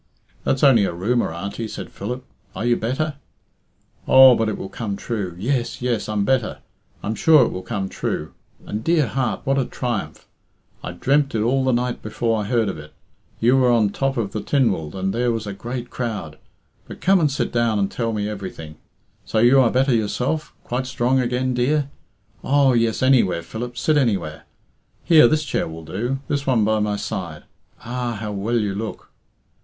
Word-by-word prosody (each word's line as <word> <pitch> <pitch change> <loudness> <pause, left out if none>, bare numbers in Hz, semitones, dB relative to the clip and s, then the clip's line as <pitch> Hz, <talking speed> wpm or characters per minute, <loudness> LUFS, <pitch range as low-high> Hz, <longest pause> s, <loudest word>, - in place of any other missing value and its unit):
"That's 135 - 0
only 130 -7 +6
a 85 - -2
rumour, 105 +5 0
Auntie," 100 +6 -5
said - - -7
Philip. 125 +6 -5 0.3
"Are 110 - -3
you 120 0 +3
better?" 140 +7 -2 0.9
"Oh, 130 -1 +9
but 115 -2 +1
it 105 - -3
will - - -6
come 100 +1 -4
true. 100 -5 -4
Yes, 120 +5 -1
yes, 120 -4 -1
I'm 105 -2 0
better. 130 -3 0 0.5
I'm 110 - -1
sure 150 +1 +5
it - - -3
will 90 - -5
come 100 -2 -3
true. - - -4 0.3
And, 105 +2 -4
dear 165 -1 +3
heart, 125 +2 -2
what 135 +1 +1
a 130 - +1
triumph! 110 -13 -4 0.6
I 90 - -5
dreamt 135 +8 +1
it 110 - +1
all 130 +3 +2
the 130 - +2
night 125 0 -1
before 110 +1 -1
I - - -4
heard 115 -2 +1
of 95 -6 -4
it. 75 0 -12 0.5
You 125 +4 +4
were 130 -2 +4
on 115 -3 +4
the - - -11
top 135 -1 -1
of 105 -4 -1
the 105 - -3
Tynwald, 100 - 0
and 95 0 -1
there 120 +1 +1
was 115 -2 -3
a 100 - -5
great 120 +4 -6
crowd. 105 -11 -4 0.5
But - - -10
come 190 +1 +4
and 155 -3 +3
sit 140 - -2
down 115 -2 +1
and 100 -1 0
tell 115 -2 -2
me 105 -2 -2
everything. 95 -7 -7 0.5
So - - -3
you 120 +4 +6
are 120 - +4
better 130 +2 +2
yourself? 125 +8 -1
Quite 125 +1 -3
strong 130 0 +1
again, 125 +1 0
dear? 140 +3 +1 0.5
Oh, 140 -1 +3
yes, 115 0 +1
any 130 -1 +6
where, 85 -3 -2
Philip 120 +7 -6
sit 155 +3 +2
anywhere. 100 - -1 0.6
Here, 160 -7 +7
this 155 +4 +1
chair - - -1
will 80 0 -9
do 115 +11 -2
this 140 -1 -2
one 120 -5 +3
by 110 0 +2
my 105 -1 0
side. 90 -7 -5 0.4
Ah! 120 0 -3
How 105 -1 -4
well 105 +4 -1
you 105 -3 0
look!" 110 +2 -6
120 Hz, 195 wpm, -22 LUFS, 105-130 Hz, 0.9 s, Oh